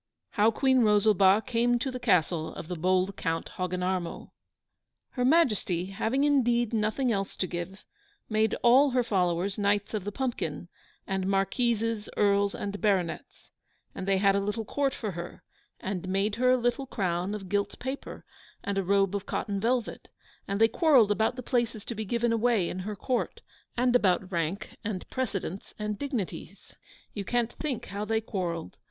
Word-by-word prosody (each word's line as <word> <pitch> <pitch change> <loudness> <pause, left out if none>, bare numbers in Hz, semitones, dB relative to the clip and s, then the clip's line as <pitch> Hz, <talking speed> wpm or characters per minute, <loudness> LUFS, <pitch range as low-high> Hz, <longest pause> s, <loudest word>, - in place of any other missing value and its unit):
HOW 210 +1 +4
QUEEN 260 +3 +3
ROSALBA 210 -1 +4
CAME 240 0 +2
TO 265 +2 -2
THE 255 - -5
CASTLE 175 -8 +1
OF 155 - -7
THE 180 - -2
BOLD 185 +3 +1
COUNT 165 -1 -2
HOGGINARMO 180 -1 -3 0.8
Her 250 - -2
Majesty, 230 - +2
having 225 +7 0
indeed 240 -5 +2
nothing 225 +4 +1
else 195 -2 -2
to - - 0
give, 180 +3 -6 0.4
made 220 0 +1
all 260 +4 +6
her 250 -1 +2
followers 190 -2 0
Knights 205 +1 +1
of 210 -3 -2
the 205 - -4
Pumpkin, 195 - -3 0.4
and 190 -1 -2
Marquises, 225 +2 0
Earls, 200 -1 +3
and 200 0 -5
Baronets; 190 -6 -1 0.4
and 190 - -6
they 195 -1 +3
had 195 0 +4
a - - +3
little 210 +3 -2
court 275 +3 0
for 215 -3 -4
her, 170 0 -8 0.4
and 185 -1 -4
made 195 +2 +1
her 250 +1 +3
a 255 - +5
little 245 +2 -1
crown 185 -2 -1
of 195 -3 -7
gilt 200 +2 -1
paper, 265 +2 -6 0.4
and 200 -1 -1
a - - 0
robe 195 +1 +2
of 200 0 -4
cotton 200 -2 -2
velvet; 235 +2 -1 0.4
and 200 +1 -2
they 225 - +7
quarrelled 250 - +4
about 220 +3 +1
the 255 - -6
places 235 -4 -1
to - - -4
be 220 -1 -4
given 235 +2 +1
away 225 -5 +2
in 185 - -5
her 205 +3 -4
court, 250 +5 -2 0.4
and 245 0 +3
about 190 -4 +2
rank 170 +2 -3
and 205 -4 -4
precedence 200 -7 -4
and 210 -1 -3
dignities; 260 -10 -5 0.4
you 205 - -4
can't 240 +2 0
think 285 -7 -4
how 205 +1 -2
they 220 +1 +1
quarrelled! 175 - -4
205 Hz, 170 wpm, -28 LUFS, 190-240 Hz, 0.8 s, they